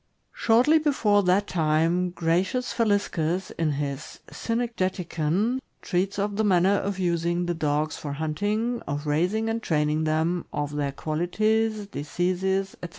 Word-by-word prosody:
Shortly 250 +8 +4
before 230 -9 +3
that 190 +2 +2
time, 165 +2 +1
Gratlus 180 +9 0
Faliscus, 200 -6 0
in 160 -3 -1
his 140 -1 -4
"Cynegeticon," 195 -2 -1 0.2
treats 190 +2 -1
of 205 0 -1
the 220 - +2
manner 190 -2 +4
of 200 -1 -1
using 175 -1 0
the 175 - 0
dogs 155 -1 -1
for 145 -2 -5
hunting, 205 +11 -1
of 145 +1 -3
raising 180 +9 +1
and 225 +1 -1
training 155 -3 +1
them, 160 +3 0
of 145 0 -3
their 145 -1 -1
qualities, 215 +9 0
diseases, 190 +3 -1
etc. 175 - -5
180 Hz, 135 wpm, -26 LUFS, 155-210 Hz, 0.2 s, Shortly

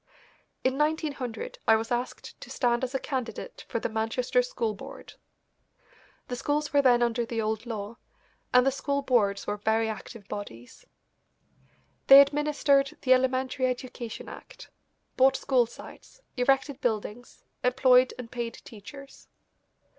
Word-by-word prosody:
In 260 +2 0
1900 295 -7 -2
I 225 - +7
was 225 +2 -3
asked 245 +1 -4
to - - -10
stand 240 -1 0
as 260 +1 -3
a - - +1
candidate 255 -6 -5
for 230 - -1
the - - -2
Manchester 225 +3 0
School 230 -3 -2
Board. 200 - -11 1.1
The 250 - -4
schools 295 +4 -2
were 285 - +5
then 245 -3 +4
under 235 0 0
the 230 0 -4
old 220 +1 -2
law, 220 0 -5 0.5
and 250 0 +5
the 270 - +3
school 280 +1 -2
boards 205 -7 +1
were 205 - -2
very 220 +2 +1
active 220 -1 -8
bodies. 125 - -9 1.2
They 275 +1 +11
administered 280 -1 +3
the 255 - +6
Elementary 260 0 +1
Education 250 -2 -5
Act, - - -12 0.5
bought 265 +1 +5
school 250 -4 +2
sites, - - -14
erected 270 +2 +1
buildings, 225 +1 -3 0.2
employed 250 0 +4
and 245 -2 -8
paid 235 -2 -4
teachers. 275 +6 -12
250 Hz, 140 wpm, -27 LUFS, 225-270 Hz, 1.2 s, They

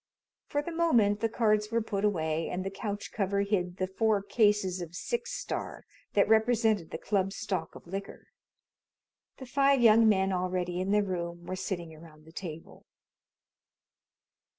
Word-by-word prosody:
For 290 0 -1
the 340 - -5
moment 240 -12 +3
the 225 +1 0
cards 215 -2 +1
were 230 - +2
put 205 -3 -3
away 160 -5 0
and 185 +1 -3
the 195 - -3
couch 205 0 -5
cover 200 -1 0
hid 185 -3 -1
the 185 - 0
four 205 +1 +1
cases 205 -4 +2
of 170 0 -7
Six 475 - -3
Star - - -5 0.3
that 200 - +4
represented 220 -4 +3
the - - -5
club's 195 -1 -1
stock 190 -6 -3
of - - -12
liquor. 195 +3 -7 1.1
The 260 - -8
five 275 +1 +3
young 225 -1 +6
men 190 -2 +2
already 180 -1 -1
in 190 - -2
the 210 +1 +3
room 175 -2 -4
were 185 +1 -4
sitting 175 -3 -4
around 155 -1 -15
the 160 - -15
table. 165 -2 -9
200 Hz, 160 wpm, -29 LUFS, 180-220 Hz, 1.1 s, young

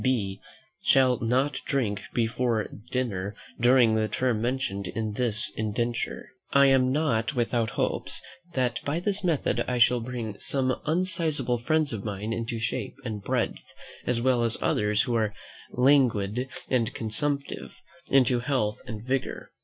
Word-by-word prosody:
B. 105 -7 0 0.4
shall 130 -3 +4
not 130 +5 +1
drink 105 -7 -1
before 115 -1 0 0.2
dinner 105 -6 -2 0.2
during 120 -1 +5
the 110 0 +2
term 120 -2 0
mentioned 120 -6 -1
in 110 -2 -3
this 105 -2 0
indenture." 115 +2 -2 0.2
I 140 0 +6
am 130 -1 +4
not 130 -4 +1
without 120 -2 +1
hopes, - - 0 0.4
that 125 -2 0
by 145 +4 -1
this 200 +2 -1
method 165 -6 +1
I 125 - 0
shall 120 +1 +5
bring 115 -3 -5
some 130 -2 0
unsizable 160 -7 +1
friends 155 +2 +1
of 100 -3 -4
mine 105 +1 -3
into 115 +1 -3
shape 115 +1 -3
and 110 -3 -4
breadth, - - -2 0.3
as 125 -1 +1
well 125 0 +2
as 115 -1 +1
others, 105 +1 +2
who 120 - -2
are 110 -3 0 0.4
languid 125 -3 +3 0.2
and 120 -3 +1
consumptive, 140 +6 -2 0.3
into 130 -2 +4
health 125 -5 -1
and 110 0 -6
vigour. 130 0 -2
120 Hz, 145 wpm, -27 LUFS, 110-130 Hz, 0.4 s, I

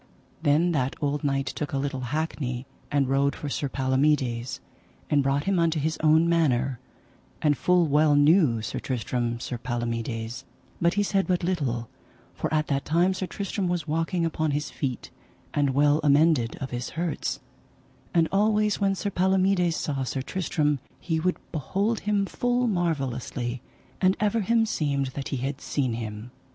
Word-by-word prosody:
Then 160 +3 +3
that 135 -4 0
old 145 +1 -1
knight 135 -1 0
took 145 +1 -4
a - - +1
little 135 0 -2
hackney, 140 -4 -2 0.3
and 140 -2 +2
rode 140 +1 +2
for 145 - -5
Sir 140 0 -2
Palomides, 130 -2 +1 0.5
and 145 -1 +4
brought 135 +1 +1
him 195 0 +1
unto 165 -1 +2
his 155 +2 -1
own 160 +1 +4
manor; 135 -7 +2 0.6
and 150 -1 +3
full 180 +1 +3
well 150 0 +4
knew 145 - +4
Sir - - -3
Tristram 120 -1 -2
Sir 120 0 -5
Palomides, 115 -1 -3 0.4
but 170 +1 +3
he 205 - +2
said 195 -1 +1
but 180 -2 +1
little, 135 -10 -1 0.5
for - - -3
at 155 -1 +2
that 140 -2 -1
time 175 +4 +2
Sir 185 0 -3
Tristram 200 -1 -3
was 175 -3 -1
walking 165 +3 0
upon 160 -1 0
his 145 +1 -2
feet, 130 -4 -4 0.4
and 140 -3 +1
well 145 +1 +4
amended 145 -5 +4
of 135 - -5
his 125 0 -3
hurts; 170 -1 -2 0.7
and 165 -2 +3
always 210 +1 +2
when 195 -1 +2
Sir 200 +1 -3
Palomides 185 -2 +2
saw 140 -3 -2
Sir 130 +1 -3
Tristram 150 -4 0 0.2
he 160 -2 -1
would 180 +3 0
behold 195 - -1
him 205 -1 +1
full 245 +4 0
marvellously, 135 - -2 0.4
and 190 0 +3
ever 215 +2 +1
him 225 +3 +3
seemed 140 - -1
that 140 -1 -4
he 135 - -2
had 135 +3 -3
seen 130 -5 -1
him. 110 +1 -6
150 Hz, 165 wpm, -26 LUFS, 130-175 Hz, 0.7 s, and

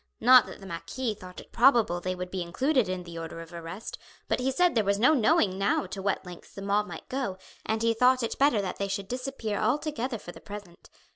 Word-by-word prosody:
Not 250 0 +7
that - - -10
the 195 - -11
marquis 215 +7 -3
thought 185 -2 -11
it - - -14
probable 235 -8 +4
they 185 +1 -2
would 180 0 -6
be 190 - -3
included 255 - +1
in 185 -1 -3
the 170 -1 -8
order 165 0 -7
of 165 +1 -10
arrest, 170 +5 -7 0.3
but - - 0
he 255 +1 +1
said 355 +6 +3
there 225 - +2
was 200 0 +1
no 250 +9 +5
knowing 210 -7 +3
now 195 0 +1
to 190 +1 -6
what 195 -1 -1
lengths 180 -1 -12
the 195 - -7
mob 205 +1 +1
might - - -9
go 255 -8 -3 0.3
and 220 +1 0
he 230 0 +3
thought 250 +2 +4
it 230 - -3
better 270 -7 +4
that 185 - -4
they 200 - -2
should 195 0 -3
disappear 250 -3 -3
altogether 270 -3 -1
for 175 - -10
the - - -14
present. 200 -4 -10
205 Hz, 235 wpm, -28 LUFS, 185-250 Hz, 0.3 s, Not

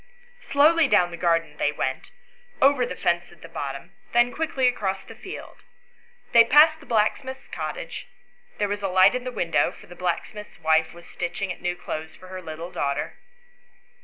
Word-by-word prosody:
Slowly 310 - +4
down 180 -4 +3
the - - -5
garden 165 -3 0
they 145 - +1
went, 130 -3 -3 0.5
over 270 -2 +4
the - - -5
fence 175 0 0
at 175 - -18
the - - -9
bottom, 140 -4 -6 0.2
then 240 +1 +4
quickly 310 -5 0
across 195 -6 -1
the - - -11
field. 380 - -10 0.7
They 230 - +8
passed 305 +6 +6
the 290 - -16
blacksmith's 245 +4 0
cottage; - - -6 0.5
there 205 - +1
was 205 0 -3
a 195 - 0
light 185 +1 +5
in 250 0 -3
the 255 - -3
window, 170 -8 +1
for - - -15
the 175 - -12
blacksmith's 180 +4 -4
wife 160 0 +2
was 175 - -13
stitching 180 +2 -4
at - - -17
new 180 0 -1
clothes 160 -2 -6
for 185 - -14
her 185 0 -7
little 165 +1 -7
daughter. 140 -2 -2
185 Hz, 180 wpm, -25 LUFS, 170-245 Hz, 0.7 s, They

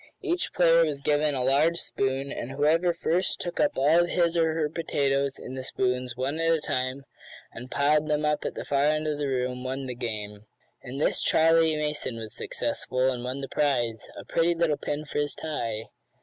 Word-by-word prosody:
Each 355 -2 -1
player 170 -1 +5
was 150 -3 -1
given 145 0 +1
a 130 - 0
large 145 +6 +3
spoon, 135 -2 -1
and 120 - -5
whoever 155 +6 +2
first 170 +2 0
took 175 - -4
up 195 - +3
all 155 +6 +5
his 175 -1 +1
or 160 -1 +2
her 160 -2 +1
potatoes 140 -3 -1
in 130 - -8
the 130 - -4
spoons 125 -1 -1
one 135 +5 -2
at 165 0 +2
a 165 - +3
time, 130 -1 -2 0.5
and 125 +2 -9
piled 150 +2 +2
them 150 0 0
up 150 0 0
at - - -4
the - - -5
far 140 0 +1
end 155 +1 +1
of 150 -1 -2
the 145 - -1
room, 125 -1 -2
won 130 +1 -3
the 125 - -4
game. 105 -3 -5 0.3
In 130 +1 -7
this 145 - +2
Charley 165 0 +4
Mason 150 -5 -2
was 110 -1 -5
successful, 130 +1 -1
and 120 -1 -4
won 130 +2 -4
the 135 - -4
prize 120 -7 0
a - - -8
pretty 170 +1 +1
little 165 -3 +1
pin 150 +1 -4
for 145 - -3
his 145 0 0
tie. 115 -8 -3
145 Hz, 205 wpm, -27 LUFS, 130-160 Hz, 0.5 s, player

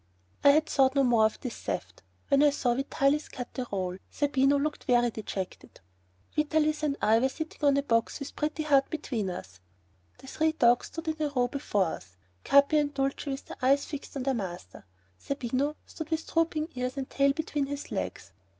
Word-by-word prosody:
I 285 - +8
had 305 +2 +5
thought 265 -2 +3
no 275 - +4
more 235 -4 +4
of 220 - -9
this 250 - -5
theft, - - -5 0.3
when 280 -1 +5
I 295 - +7
saw 255 -4 0
Vitalis 275 +3 0
cut 250 -1 -7
the 255 -2 -4
roll; 185 -2 -2
Zerbino 280 -1 +2
looked 295 +1 -2
very 240 -2 +3
dejected. 195 -4 -6 0.6
Vitalis 305 0 +1
and 290 -2 0
I 220 +1 +5
were 265 +2 +2
sitting 315 +2 -7
on 280 -1 +4
a 280 - +1
box 230 -1 0
with 280 - -7
Pretty 310 +1 -2
Heart 280 -3 +3
between 245 -10 -3
us. 90 - -8 0.6
The - - -15
three 315 +4 0
dogs 240 -5 +3
stood 330 0 -8
in 315 0 -2
a 300 - +1
row 250 -3 +1
before 210 -8 0
us, 90 - -7 0.3
Capi 280 +2 +5
and 290 -1 0
Dulcie 275 +1 -2
with 270 0 -4
their - - -9
eyes 275 +2 +3
fixed 290 -1 -7
on 265 - -3
their 270 +1 +1
master. 175 - -6 0.3
Zerbino 280 +2 -1
stood 320 -1 -8
with 320 0 -1
drooping 325 -1 0
ears 250 +2 -3
and 265 -1 -3
tail 275 0 +2
between 295 -2 -2
his 285 0 -6
legs. - - -4
275 Hz, 195 wpm, -28 LUFS, 245-300 Hz, 0.6 s, I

